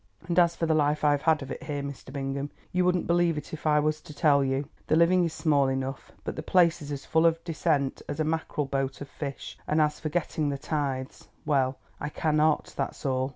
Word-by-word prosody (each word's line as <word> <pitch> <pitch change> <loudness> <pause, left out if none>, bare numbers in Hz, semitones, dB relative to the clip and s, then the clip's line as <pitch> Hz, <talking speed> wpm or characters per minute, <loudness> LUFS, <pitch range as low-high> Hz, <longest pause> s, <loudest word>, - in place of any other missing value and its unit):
"And 175 0 +3
as 170 -1 +4
for 165 - -1
the 160 - +2
life 150 -1 +2
I've 145 -1 +3
had 160 -2 +2
of 135 - -8
it - - -5
here, 145 -2 -4
Mr. 140 -2 -7
Bingham, 140 0 -3 0.2
you 180 0 +2
wouldn't 180 -1 +2
believe 170 -2 +2
it 150 - -7
if 155 0 -4
I 150 0 +5
was 155 +1 0
to 150 - -12
tell 145 -3 +4
you. 135 +1 -1 0.2
The - - +3
living 175 +2 +5
is 165 - -2
small 145 -4 +2
enough, 135 0 -3
but - - -4
the - - -4
place 175 -3 +3
is 145 0 -7
as 140 -1 -5
full 160 +1 +4
of 165 0 0
dissent 150 -4 0
as 145 +1 -4
a - - +3
mackerel 155 -1 -1
boat 135 -1 -2
of 145 - -5
fish, 140 -2 -6
and 155 - +2
as 150 -1 +2
for 155 - -3
getting 155 -2 -1
the 140 - -2
tithes—well, 135 -1 -2 0.2
I - - -3
cannot, 155 0 +1
that's - - -4
all. 130 -1 +1
150 Hz, 230 wpm, -27 LUFS, 140-160 Hz, 0.2 s, I